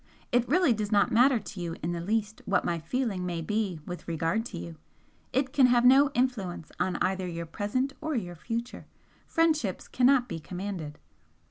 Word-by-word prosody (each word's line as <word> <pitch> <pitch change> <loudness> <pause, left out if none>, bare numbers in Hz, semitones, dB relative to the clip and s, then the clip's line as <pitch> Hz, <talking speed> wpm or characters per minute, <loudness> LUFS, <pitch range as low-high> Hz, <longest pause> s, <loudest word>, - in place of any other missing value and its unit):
It 245 0 +2
really 330 -3 +4
does 210 -1 -3
not 205 -1 +3
matter 250 +3 +5
to 200 -3 -7
you 170 -1 -3
in 170 - -1
the 170 -1 -3
least 215 +3 -1
what 195 -2 +1
my 170 -1 0
feeling 200 - -2
may 175 -2 -2
be 195 0 -1
with 180 0 -7
regard 165 +7 -1
to 185 - -8
you, 165 -1 -7 0.5
it 265 0 0
can 270 -3 +6
have 245 0 +4
no 270 +3 +7
influence 210 -10 -1
on 185 - 0
either 190 0 0
your 170 -1 -4
present 210 +11 -2
or 315 -1 -2
your 180 -7 -3
future. 230 +8 -5 0.4
Friendships 310 - +1
cannot 255 0 +3
be 165 - -5
commanded." 175 -3 -6
205 Hz, 185 wpm, -28 LUFS, 175-250 Hz, 0.5 s, no